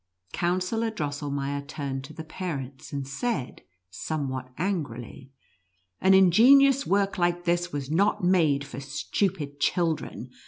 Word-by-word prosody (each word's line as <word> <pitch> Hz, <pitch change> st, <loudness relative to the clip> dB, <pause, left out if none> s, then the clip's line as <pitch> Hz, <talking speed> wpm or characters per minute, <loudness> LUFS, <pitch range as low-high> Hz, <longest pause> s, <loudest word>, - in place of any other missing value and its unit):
Counsellor 185 Hz, +6 st, 0 dB
Drossel 145 Hz, -7 st, -4 dB
meier 140 Hz, 0 st, -2 dB
turned 140 Hz, -2 st, -5 dB
to 155 Hz, -, -11 dB
the 160 Hz, -, -7 dB
parents, 145 Hz, -6 st, -6 dB
and 140 Hz, -2 st, -4 dB
said, 135 Hz, -, -3 dB, 0.3 s
somewhat 130 Hz, +2 st, -4 dB
angrily, 140 Hz, -, -4 dB, 0.4 s
" 90 Hz, -1 st, -45 dB
An 190 Hz, 0 st, +6 dB
ingenious 265 Hz, +9 st, +6 dB
work 195 Hz, -1 st, +1 dB
like 175 Hz, 0 st, +1 dB
this 175 Hz, 0 st, 0 dB
was 140 Hz, -1 st, -4 dB
not 190 Hz, +3 st, +2 dB
made 160 Hz, -6 st, +3 dB
for 140 Hz, -2 st, -8 dB
stupid 145 Hz, +2 st, -2 dB
children. 160 Hz, -6 st, -1 dB
155 Hz, 130 wpm, -26 LUFS, 140-185 Hz, 0.4 s, An